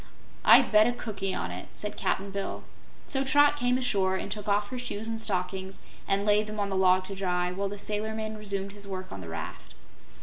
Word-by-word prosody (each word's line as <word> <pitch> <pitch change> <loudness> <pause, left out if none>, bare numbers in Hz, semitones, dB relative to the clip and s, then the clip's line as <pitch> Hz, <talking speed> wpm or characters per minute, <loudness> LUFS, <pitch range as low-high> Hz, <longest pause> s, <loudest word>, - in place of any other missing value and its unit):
"I'd - - +7
bet 215 +1 +7
a 245 - +1
cookie 205 -5 -3
on 90 - -3
it," 90 +1 -6
said 210 - -5
Cap'n 195 +1 -1
Bill, 195 0 -4 0.4
so 270 -1 0
Trot 290 +1 +5
came 250 -3 +1
ashore 195 -7 +1
and 195 - -4
took 210 0 -3
off 205 0 +1
her 255 - -4
shoes 225 -3 -4
and 225 0 -2
stockings 190 -1 -2 0.3
and 200 +1 +1
laid 210 0 +3
them 215 0 -5
on 200 -1 0
the 195 - -2
log 185 0 +4
to 195 - -6
dry, 180 -2 0
while 195 +2 -2
the 205 - -6
sailor 210 +2 -2
man 220 0 -4
resumed 200 -2 -4
his 200 0 -9
work 185 -1 -6
on 95 - -7
the 80 - -8
raft. 85 - -7
200 Hz, 225 wpm, -28 LUFS, 190-215 Hz, 0.4 s, I'd